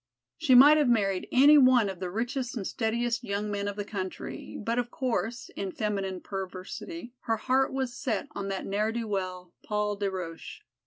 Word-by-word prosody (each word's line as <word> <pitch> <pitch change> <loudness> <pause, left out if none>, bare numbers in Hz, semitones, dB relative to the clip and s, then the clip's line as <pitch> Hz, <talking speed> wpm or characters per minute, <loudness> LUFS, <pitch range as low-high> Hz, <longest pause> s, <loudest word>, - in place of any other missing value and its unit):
She 300 -6 +3
might 290 +5 +9
have 295 -4 +3
married 195 -5 +1
any 290 +3 +7
one 255 -5 +5
of 190 -3 -5
the 185 -1 -3
richest 245 +5 -3
and 200 - -4
steadiest 235 +2 -1
young 205 -1 -2
men 200 0 -2
of 205 - -3
the 205 -1 -4
country, 190 -3 -6
but 230 +3 -1
of 245 -1 -2
course, 240 -2 -2
in 195 -1 -3
feminine 195 -2 -2
perversity 195 - -6
her 225 -1 +1
heart 260 +4 +1
was 265 -2 -2
set 240 -6 -2
on 200 -1 -5
that 195 -1 -3
ne'er 210 +3 0
do 230 -1 -3
well, 185 -3 -4
Paul 210 0 -1
des 200 -1 0
Roches. 185 - -7
215 Hz, 190 wpm, -28 LUFS, 195-245 Hz, -, might